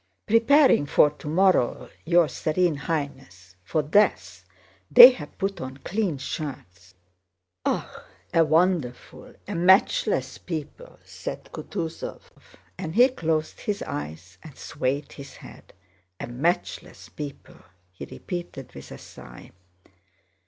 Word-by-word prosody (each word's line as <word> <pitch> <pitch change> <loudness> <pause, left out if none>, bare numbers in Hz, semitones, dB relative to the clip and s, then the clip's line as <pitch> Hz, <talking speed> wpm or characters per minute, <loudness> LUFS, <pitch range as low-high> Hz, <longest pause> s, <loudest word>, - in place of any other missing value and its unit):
"Preparing 230 - +4
for 145 +1 +4
tomorrow, 160 -2 +1 0.2
your 170 0 +4
Serene 165 +3 0
Highness—for 135 - -5
death—they 95 - +4
have 150 - -10
put 195 0 -3
on 130 +1 -7
clean 185 +1 -2
shirts." 90 - -8 0.7
"Ah... - - -3 0.3
a 165 - +5
wonderful, 160 -5 -1
a - - -5
matchless 180 - +2
people!" 165 - -7
said - - -8
Kutúzov; 165 -5 -6 0.6
and 160 -4 -5
he 250 +3 +6
closed 160 -9 -2
his 205 -1 -3
eyes 80 +5 -7
and 155 - -14
swayed 140 +3 -3
his 140 -1 -11
head. - - -14 0.5
"A - - -4
matchless 170 +7 -3
people!" 145 -2 -10 0.3
he 90 - -9
repeated 175 -8 -8
with 70 - -12
a - - -8
sigh. - - -14
155 Hz, 110 wpm, -25 LUFS, 125-180 Hz, 0.7 s, he